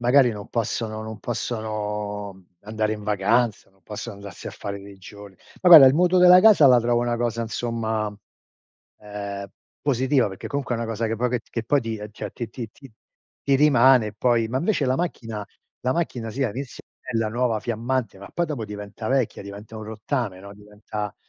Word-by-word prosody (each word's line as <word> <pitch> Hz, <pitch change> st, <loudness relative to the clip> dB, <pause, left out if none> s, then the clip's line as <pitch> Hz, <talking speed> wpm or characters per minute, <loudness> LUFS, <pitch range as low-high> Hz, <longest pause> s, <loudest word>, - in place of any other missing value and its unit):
magari 125 Hz, +1 st, +5 dB
non 105 Hz, -3 st, -8 dB
possono 110 Hz, -1 st, -2 dB
non 110 Hz, -1 st, -7 dB
possono, 105 Hz, -3 st, -4 dB
mhmm, 95 Hz, -1 st, -20 dB, 0.2 s
andare 110 Hz, +1 st, -2 dB
in 105 Hz, -1 st, -6 dB
vacanza, 105 Hz, +3 st, +1 dB
non 95 Hz, -1 st, -33 dB
possono 105 Hz, +3 st, -7 dB
andarsi 100 Hz, -2 st, -10 dB
a -, -, -4 dB
fare 100 Hz, 0 st, -6 dB
dei 100 Hz, 0 st, -12 dB
giorni. 100 Hz, 0 st, -12 dB, 0.3 s
Ma 180 Hz, -, +5 dB
guarda 160 Hz, -6 st, +11 dB
il 130 Hz, -, +5 dB
mutuo 180 Hz, +3 st, +3 dB
della 180 Hz, 0 st, +8 dB
casa, 205 Hz, -8 st, +7 dB
la 125 Hz, -2 st, +7 dB
trovo 120 Hz, 0 st, +1 dB
una 120 Hz, -1 st, 0 dB
cosa, 115 Hz, -1 st, -1 dB
insomma, 110 Hz, -2 st, -2 dB, 0.9 s
ehm, 100 Hz, -1 st, -6 dB, 0.3 s
positiva 130 Hz, -2 st, +2 dB
perché 95 Hz, -, -8 dB
comunque 140 Hz, -3 st, -2 dB
è -, -, -3 dB
una 115 Hz, -, -3 dB
cosa 115 Hz, 0 st, -2 dB
che 115 Hz, +1 st, -2 dB
poi 125 Hz, +3 st, 0 dB
che 125 Hz, -1 st, -1 dB
t -, -, -32 dB
che 115 Hz, -, -3 dB
poi 145 Hz, +5 st, +2 dB
ti 115 Hz, -2 st, -4 dB
ehm, 105 Hz, 0 st, -8 dB
ti 105 Hz, -, -15 dB
ehm, -, -, -4 dB
ti 120 Hz, -2 st, -5 dB
ti 115 Hz, -1 st, -6 dB
ti 135 Hz, 0 st, -16 dB, 0.5 s
ti 140 Hz, -, +2 dB
rimane 130 Hz, -6 st, +5 dB
poi, 115 Hz, 0 st, +1 dB
ma 130 Hz, +3 st, -1 dB
invece 170 Hz, -2 st, 0 dB
la 130 Hz, +1 st, +1 dB
macchina 115 Hz, -11 st, -4 dB, 0.4 s
la 130 Hz, +1 st, 0 dB
macchina 125 Hz, -9 st, -2 dB
sì, 135 Hz, +5 st, -3 dB
all'inizio 125 Hz, +3 st, -5 dB, 0.2 s
è -, -, -8 dB
bella, 115 Hz, -1 st, 0 dB
nuova 115 Hz, -1 st, 0 dB
fiammante, 115 Hz, -2 st, -2 dB
ma 100 Hz, -, -10 dB
poi 175 Hz, -, 0 dB
dopo 145 Hz, -8 st, -4 dB
diventa 105 Hz, +1 st, -7 dB
vecchia, 130 Hz, -6 st, 0 dB
diventa 100 Hz, +3 st, -10 dB
un 110 Hz, -, -7 dB
rottame, 110 Hz, -2 st, -3 dB
no, 100 Hz, +1 st, -11 dB
diventa 105 Hz, 0 st, -7 dB
115 Hz, 205 wpm, -24 LUFS, 105-125 Hz, 0.9 s, guarda